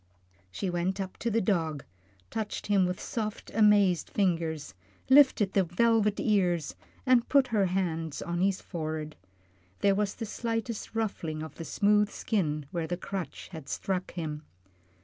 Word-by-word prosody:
She 190 - -4
went 180 +2 -1
up 190 -1 -4
to 235 - -1
the 230 +1 +2
dog, 165 -8 0 0.5
touched 220 -2 -3
him 195 -3 +3
with 180 0 -3
soft, 215 -3 -4
amazed 205 -5 +4
fingers, 165 - -1 0.4
lifted 260 -8 +6
the 195 - +4
velvet 210 +4 +2
ears, 175 - +1 0.3
and 250 -2 +4
put 275 -2 +4
her 205 -4 +2
hands 165 -4 -2
on 175 0 -2
his 195 0 +1
forehead. 155 -3 -4 0.7
There 200 -1 +4
was 205 0 0
the 230 - -4
slightest 225 0 -3
ruffling 165 -8 -2
of 160 -2 -8
the 165 - -8
smooth 210 +2 +3
skin 155 -12 -1
where 170 -2 -2
the 175 - -2
crutch 190 -1 -6
had 160 -6 -9
struck 185 -1 -2
him. 155 -4 -4
190 Hz, 150 wpm, -29 LUFS, 165-210 Hz, 0.7 s, lifted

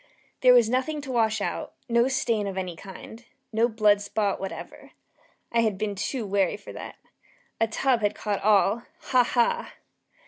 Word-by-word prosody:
There 250 -1 +7
was 240 -3 +6
nothing 260 +6 -1
to 275 -2 -6
wash 220 -3 +1
out - - -3
no 235 +1 +3
stain 230 -6 0
of 195 -1 -5
any 180 -2 -3
kind 200 +5 -11 0.3
no 225 +2 +3
blood 210 -2 +3
spot 205 0 -1
whatever. 195 0 -8 0.6
I 235 - +2
had 220 -4 +1
been 210 0 -2
too 220 +4 -3
wary 195 -2 +1
for 205 - -11
that. - - -8 0.6
A 225 - +3
tub 240 +2 +1
had 205 -1 +1
caught 205 -2 -2
all 210 +2 +3 0.3
ha! 255 -1 +5
ha! 250 - 0
220 Hz, 170 wpm, -26 LUFS, 205-240 Hz, 0.6 s, There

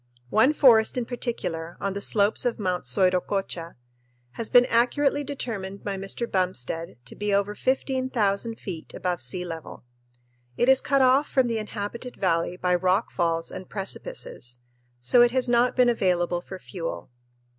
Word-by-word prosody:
One 225 +6 +5
forest 240 -6 +5
in 245 - -1
particular, 175 -9 -4
on 195 -1 -2
the 200 - -4
slopes 205 0 +2
of 245 -2 0
Mt. 180 - -2
Soiroccocha, 180 +3 0 0.6
has 230 - -5
been 245 0 +7
accurately 275 +5 +2
determined 205 -9 -5
by 200 -1 -3
Mr. 195 +5 -3
Bumstead 180 - -2
to - - -8
be 210 0 -2
over 200 +1 +1
15,000 240 -4 -1
feet 170 -5 -7
above 180 -4 -2
sea 155 +8 -3
level. 165 -5 -8 0.7
It 240 - +2
is 265 0 +6
cut 275 -1 +2
off 265 +3 +4
from 260 -2 +3
the 230 -2 -1
inhabited 215 +3 -6
valley 170 -1 0
by 180 0 0
rock 185 +4 +1
falls 165 -2 -1
and 185 -1 -8
precipices, 195 - -6 0.4
so 125 - +4
it 240 - +6
has 255 +1 0
not 240 +1 +3
been 250 -1 +4
available 180 -6 +1
for 190 +1 -9
fuel. 175 -8 -6
200 Hz, 155 wpm, -25 LUFS, 180-245 Hz, 0.7 s, been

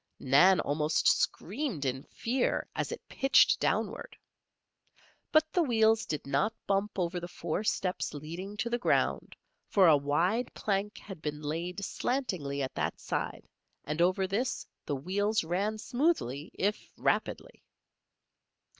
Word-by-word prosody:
Nan 160 +9 +5
almost 150 +2 +1
screamed 210 - 0
in 130 0 -1
fear 245 +2 -1
as - - -2
it - - -7
pitched 270 -1 +4
downward. - - -1 1.1
But 310 0 +3
the 355 - +3
wheels 225 -5 +3
did 150 - -3
not 140 +11 0
bump 200 +1 0
over 175 -1 -1
the 175 - -6
four 175 +2 -3
steps 185 -3 -1
leading 170 +8 -7
to 225 +3 -1
the 240 - 0
ground, - - +1 0.3
for 195 -2 +4
a 160 - +8
wide 170 - +1
plank 205 0 -1
had 190 -6 -10
been 150 0 -4
laid 175 +6 -3
slantingly 180 - -2
at 130 - -4
that - - -2
side, - - -3 0.4
and 150 +3 -2
over 185 +2 +3
this 210 +7 -1 0.2
the 145 - 0
wheels 200 +9 0
ran 195 +6 -1
smoothly, 220 - 0
if 205 +2 -1
rapidly. - - -1
190 Hz, 135 wpm, -30 LUFS, 150-220 Hz, 1.1 s, a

